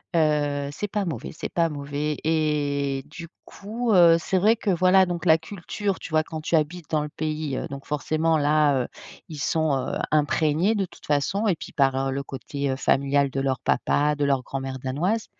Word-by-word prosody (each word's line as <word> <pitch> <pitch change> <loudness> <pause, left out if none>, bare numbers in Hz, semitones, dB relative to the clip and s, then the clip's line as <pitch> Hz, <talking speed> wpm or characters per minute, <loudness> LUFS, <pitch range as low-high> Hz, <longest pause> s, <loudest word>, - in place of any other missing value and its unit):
heu, 145 -3 +1
c'est 205 +8 -4
pas 200 0 -2
mauvais, 135 -9 -5
c'est - - -5
pas 170 -1 +2
mauvais 145 +1 -3
et 145 -3 0
du 165 +2 -9 0.2
coup, 225 +3 -4
heu, 170 -2 +7
c'est 190 +3 -1
vrai 215 +5 +4
que, 215 - -3
voilà, 185 +1 +5
donc 175 0 -4
la 160 -1 +6
culture, 195 +3 -4
tu - - -8
vois 155 0 +3
quand 160 -1 -7
tu 165 - 0
habites 155 +1 -1
dans 155 -1 +2
le 150 - -5
pays, 155 -3 -3
heu, - - -4
donc 140 0 -8
forcément, 155 +2 +1
là, 145 -2 +3
heu, - - -6 0.4
ils 150 -2 -7
sont, 155 0 +1
heu, 130 - -2
imprégnés 155 +6 +2
de 195 -2 0
toute - - -16
façon 155 +9 +1
et 185 - +3
puis - - -9
par 135 -1 +1
le 140 +1 -2
côté 140 0 -4
familial 140 0 +2
de 135 - -2
leur 135 -1 0
papa, 145 +4 +1
de 145 - 0
leur 135 -2 +2
grand-mère 135 0 -5
danoise 170 - -1
150 Hz, 200 wpm, -24 LUFS, 140-170 Hz, 0.4 s, heu